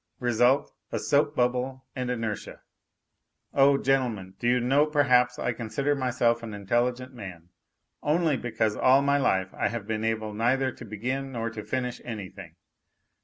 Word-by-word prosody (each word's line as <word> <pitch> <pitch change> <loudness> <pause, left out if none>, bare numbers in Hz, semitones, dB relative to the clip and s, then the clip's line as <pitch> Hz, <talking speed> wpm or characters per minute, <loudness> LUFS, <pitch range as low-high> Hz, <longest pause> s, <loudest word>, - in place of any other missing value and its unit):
Result: 120 +2 +2 0.2
a - - -1
soap 145 +1 +1
bubble 125 +1 0
and 125 -1 -3
inertia. 115 -4 -4 0.9
Oh, 140 0 +5
gentlemen, 120 -9 0
do 120 - -1
you 125 +1 +4
know, 135 +5 +3
perhaps 125 -5 +3
I - - -1
consider 140 +5 -1
myself 125 -3 +1
an 110 -3 -6
intelligent 120 +5 -1
man, 90 -7 -9 0.5
only 155 0 +2
because 110 -4 -1
all 135 +4 +4
my 140 0 +3
life 95 -8 +1
I - - 0
have 115 -3 -4
been 110 0 -2
able 110 -1 -1
neither 130 +4 +1
to 120 - -11
begin 130 +6 -3
nor 115 -1 -3
to 110 -1 -7
finish 125 -2 -3
anything. 95 -6 -8
125 Hz, 155 wpm, -27 LUFS, 110-135 Hz, 0.9 s, Oh